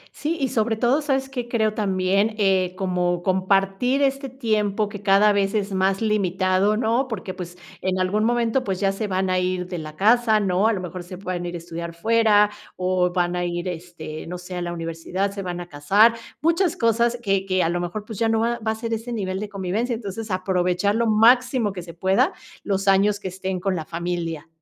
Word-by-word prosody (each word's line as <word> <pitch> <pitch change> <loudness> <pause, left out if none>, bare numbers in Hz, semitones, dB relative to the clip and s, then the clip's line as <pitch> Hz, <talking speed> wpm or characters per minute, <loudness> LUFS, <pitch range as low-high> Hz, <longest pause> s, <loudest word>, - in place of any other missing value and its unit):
Sí, 325 +3 -2
y 270 -3 0
sobre 225 0 +1
todo 245 +6 +2
sabes 270 -2 0
que 250 -3 -5
creo 220 -3 +1
también, 200 +1 +1
eh, 190 -3 +2
como 180 -2 0
compartir 195 +7 +1
este 275 0 0
tiempo 215 -5 0
que 205 -1 -8
cada 205 +1 +5
vez 200 +1 +1
es 200 -2 -1
más 190 +1 +1
limitado, 195 -1 +1
¿no? 235 +3 +1
Porque, 195 -5 -5
pues, 180 -1 -8 0.2
en 185 0 -1
algún 200 +4 +1
momento, 240 +2 +1
pues, 190 -5 -2
ya 195 0 +2
se 205 +2 -3
van 190 -1 0
a 185 - +2
ir 180 0 -1
de 180 -1 -5
la 155 -1 -8
casa, 220 +2 +4
¿no? 195 +1 +2
A 225 - +3
lo 185 - -3
mejor 180 0 -6
se 180 +1 -9
puedan 180 -2 -4
ir 175 - -5
a - - -2
estudiar 170 0 -7
fuera, 210 +1 +4 0.2
o, 180 -1 +1
van 175 0 0
a 175 - -1
ir, 175 +1 -3
este, 165 -3 -7
no 180 +1 -5
sé, 180 +1 -8
a 180 - -3
la 175 0 -3
universidad, 170 +4 -3
se 200 - -6
van 180 -2 -4
a 175 - -7
casar, 195 +10 +4 0.3
muchas 335 +2 +2
cosas 235 +1 +2
que 195 -1 +1
que 185 -1 +2
a 165 - +1
lo 175 - -1
mejor, 175 +4 -4
pues, 220 -1 -8
ya 225 - +2
no 225 0 +2
va 235 +1 0
va 220 0 -3
a - - -2
ser 230 +1 -4
ese 225 +2 -4
nivel 190 -4 -2
de 210 0 -5
convivencia. 205 +5 -2
Entonces 220 0 -6
aprovechar 185 +1 +1
lo 230 +1 +1
máximo 235 0 +4
que 180 - -6
se 170 -1 -11
pueda 190 +3 +2 0.3
los 195 -1 -1
años 200 +1 +4
que 190 - -5
estén 185 0 -4
con 190 0 -1
la 160 - -3
familia. 170 -2 -4
195 Hz, 220 wpm, -23 LUFS, 180-225 Hz, 0.3 s, cada